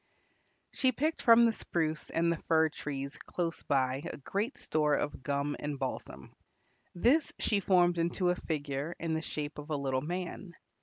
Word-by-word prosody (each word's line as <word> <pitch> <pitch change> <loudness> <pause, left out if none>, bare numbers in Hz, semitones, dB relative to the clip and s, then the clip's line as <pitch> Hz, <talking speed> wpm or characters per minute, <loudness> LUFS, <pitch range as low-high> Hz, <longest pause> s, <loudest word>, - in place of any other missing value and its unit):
She 260 -1 +2
picked 305 +6 -1
from 235 0 +7
the 230 - +3
spruce 160 -6 -2
and 170 +1 +2
the 165 - -7
fir 160 -1 +4
trees 140 -2 -5
close 170 -2 -3
by 130 -1 +1
a - - -8
great 205 - -2
store 150 -1 +1
of 145 - -2
gum 140 +2 -1
and 145 -1 -3
balsam. 130 -1 -5 0.6
This 260 - +3
she 210 - +1
formed 175 -3 +3
into 175 +2 +1
a - - 0
figure 150 -1 -3
in 165 -1 -2
the 160 - 0
shape 150 -2 -4
of 150 +1 -9
a 150 - 0
little 135 -2 0
man. 175 +2 -5
160 Hz, 170 wpm, -31 LUFS, 145-180 Hz, 0.6 s, from